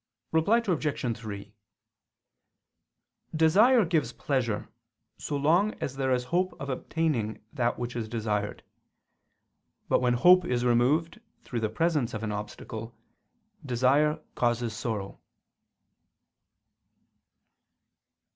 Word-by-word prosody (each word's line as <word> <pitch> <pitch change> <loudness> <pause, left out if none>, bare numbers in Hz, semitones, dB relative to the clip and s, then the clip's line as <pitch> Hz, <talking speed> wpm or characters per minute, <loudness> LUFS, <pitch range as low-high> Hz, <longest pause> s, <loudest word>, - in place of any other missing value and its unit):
Reply 160 +8 +3
Obj. 150 - -1
3: 100 -2 -8 1.8
Desire 205 +9 +5
gives 165 -2 0
pleasure, 125 -7 -1 0.5
so 145 - -3
long 170 +9 +2
as 135 - -5
there 135 -1 0
is 125 -1 +1
hope 180 +8 -1
of 140 +1 -5
obtaining 130 -7 -2
that 120 -4 0
which 120 0 -4
is 115 -2 -4
desired. 105 -3 -2 1.3
But, - - +3
when 125 -1 +2
hope 180 +8 +6
is 125 -7 -1
removed 145 - +2 0.2
through 120 - -4
the 110 -1 -1
presence 150 -1 0
of 110 - -5
an 105 - -2
obstacle, 110 +2 -7 0.7
desire 140 +4 +2
causes 120 -1 0
sorrow. 105 -3 -4
125 Hz, 105 wpm, -28 LUFS, 115-160 Hz, 1.8 s, hope